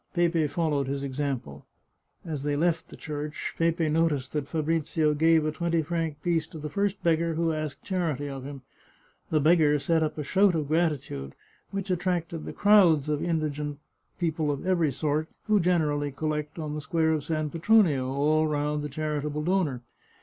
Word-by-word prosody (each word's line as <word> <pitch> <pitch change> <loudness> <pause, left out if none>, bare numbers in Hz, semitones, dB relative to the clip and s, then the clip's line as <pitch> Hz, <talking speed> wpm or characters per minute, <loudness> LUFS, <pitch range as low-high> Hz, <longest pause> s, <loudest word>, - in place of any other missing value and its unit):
Pepe 170 -3 +2
followed 145 -2 0
his 140 +1 -3
example. 130 - -4 0.6
As 155 -5 -4
they 145 0 -1
left 165 +2 0
the - - -11
church 150 -1 -5
Pepe 165 0 +2
noticed 155 -4 0
that 150 -2 -2
Fabrizio 155 -1 0
gave 160 +1 +4
a 155 - 0
twenty 170 0 0
franc 160 -2 -3
piece 165 -2 +1
to 160 - -10
the 150 -1 -6
first 200 +2 -1
beggar 165 0 +2
who 165 0 +1
asked 155 -2 -4
charity 165 -7 -1
of 135 -2 -6
him. 140 -1 -8 0.7
The 155 - +2
beggar 155 -1 +4
set 160 +3 +1
up 155 0 -1
a 150 - -2
shout 190 +5 +3
of 150 -3 -2
gratitude, 150 - -1 0.3
which 195 -1 -3
attracted 175 -3 -1
the - - -5
crowds 175 -8 +5
of 150 -1 0
indigent 150 -3 -2 0.4
people 160 -3 -1
of 145 +3 -3
every 170 -5 +2
sort 155 +3 -1 0.2
who 215 -1 +3
generally 150 -5 +1
collect 150 +2 -3
on 155 -2 -4
the 150 - -4
square 160 +1 +1
of 155 -2 -1
San 155 0 -2
Petronio 165 -7 +3
all 155 +3 +2
round 150 0 -1
the 150 - -4
charitable 150 0 -2
donor. 160 -8 0
155 Hz, 175 wpm, -27 LUFS, 145-165 Hz, 0.7 s, crowds